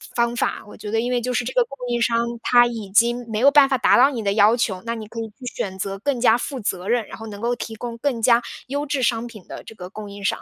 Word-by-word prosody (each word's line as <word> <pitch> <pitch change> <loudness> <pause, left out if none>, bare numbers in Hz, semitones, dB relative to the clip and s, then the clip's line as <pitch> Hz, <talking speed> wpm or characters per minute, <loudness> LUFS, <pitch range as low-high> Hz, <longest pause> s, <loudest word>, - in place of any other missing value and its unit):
方 235 0 +1
法。 - - -1
我 - - -12
觉 210 0 -7
得 225 - +1
因 245 +2 -2
为 250 - +2
就 250 +1 -2
是 245 - 0
这 240 - -5
个 - - +4
供 275 -12 -12
应 240 0 0
商， 230 0 +2 0.3
他 240 -1 +5
已 225 -4 -6
经 235 +4 +3
没 215 - -1
有 270 +4 +6
办 285 -1 +7
法 270 - +1
达 - - +4
到 265 +4 +6
你 240 -5 -4
的 200 -2 0
要 210 +2 +5
求， 195 -6 -2
那 230 - -2
你 220 -2 -7
可 230 +2 -8
以 225 - -3
去 250 +5 -14
选 190 -1 -4
择 195 0 -3
更 265 +3 -1
加 235 -1 +5
负 265 +2 -5
责 190 -4 -3
任， 235 -1 +1
然 - - -9
后 225 - -9
能 205 -1 -9
够 240 +1 0
提 230 -1 -6
供 235 +1 -6
更 245 -2 -1
加 235 +1 +4 0.2
优 285 +3 -2
质 280 -2 -1
商 230 -1 +1
品 215 -6 -13
的 - - -8
这 - - -11
个 180 -4 -9
供 210 0 -9
应 200 0 -10
商。 195 - +1
235 Hz, 330 characters per minute, -22 LUFS, 215-245 Hz, 0.3 s, 办